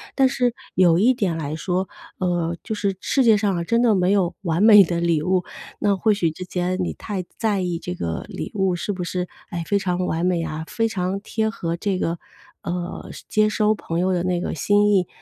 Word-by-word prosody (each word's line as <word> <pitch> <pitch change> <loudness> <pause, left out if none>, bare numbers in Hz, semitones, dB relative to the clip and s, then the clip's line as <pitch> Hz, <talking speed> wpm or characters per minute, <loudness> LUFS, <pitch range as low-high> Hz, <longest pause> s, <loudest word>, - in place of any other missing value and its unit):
但 265 -1 +4
是， 245 -2 +1 0.2
有 175 -3 +5
一 235 +8 +4
点 195 -9 -1
来 150 -2 -4
说， 185 +2 -1 0.3
呃， 175 -2 0
就 220 - -4
是 200 -2 -1
世 275 - +1
界 225 -2 +7
上 205 -1 +1
啊， 170 - -1
真 230 +5 +2
的 235 -3 +4
没 185 -2 +2
有 185 -4 +1
完 170 +1 +1
美 210 -2 +9
的 170 0 -2
礼 170 -3 +2
物。 180 +3 +1 0.4
那 205 -1 +2
或 215 +3 +3
许 180 -5 +1
之 180 +4 -8
前 180 0 -2
你 - - -2
太 200 -4 -5
在 215 -3 +1
意 175 -2 -2
这 90 - -5
个 85 -2 -3
礼 - - -6
物 190 -3 +1
是 205 +4 -3
不 185 -2 -4
是， 180 +1 -3 0.2
哎， 170 -1 -4
非 200 - +2
常 180 -1 -1
完 165 -1 -1
美 180 -2 +1
呀、 160 -1 -4
非 225 0 0
常 190 -2 -2
贴 220 +2 -1
合 170 -6 -3
这 190 +2 -1
个， 170 -2 -2 0.4
呃， 175 0 -5 0.2
接 215 0 +3
收 215 0 +2
朋 170 -5 -4
友 185 +1 +1
的 175 -1 0
那 180 -1 0
个 - - -3
心 205 +7 +3
意。 185 -4 +3
185 Hz, 240 characters per minute, -22 LUFS, 170-205 Hz, 0.4 s, 美